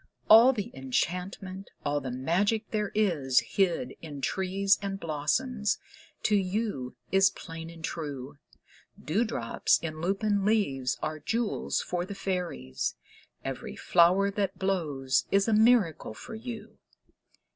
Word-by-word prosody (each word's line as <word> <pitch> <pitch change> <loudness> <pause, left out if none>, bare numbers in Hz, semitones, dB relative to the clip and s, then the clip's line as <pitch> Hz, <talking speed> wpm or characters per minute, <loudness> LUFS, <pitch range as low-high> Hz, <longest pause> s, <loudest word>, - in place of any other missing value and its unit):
All 230 +4 +10
the 210 -6 -4
enchantment, 180 +8 -3 0.2
all 145 0 0
the 130 - -4
magic 185 - 0
there 210 -2 -1
is 155 -12 +3
Hid 170 -10 0
in 150 -4 -7
trees 190 +5 +1
and 195 -1 -3
blossoms, 205 - 0 0.5
to 210 - +3
you 190 - -1 0.2
is 195 0 +5
plain 165 -1 -8
and 165 -1 -12
true. 145 -4 -5 0.6
Dewdrops 165 - +1
in 155 -1 -6
lupin 200 +3 +1
leaves 140 - +1
are 155 0 -2
jewels 230 +6 -1
for 175 -1 -2
the 200 +2 -7
fairies; 180 - -3 0.5
Every - - -5
flower 180 +3 +4
that 200 -1 -2
blows 150 -9 0
is 195 +1 +3
a 225 - +2
miracle 215 - +3
for - - -9
you. 225 0 -8
185 Hz, 125 wpm, -29 LUFS, 150-205 Hz, 0.6 s, All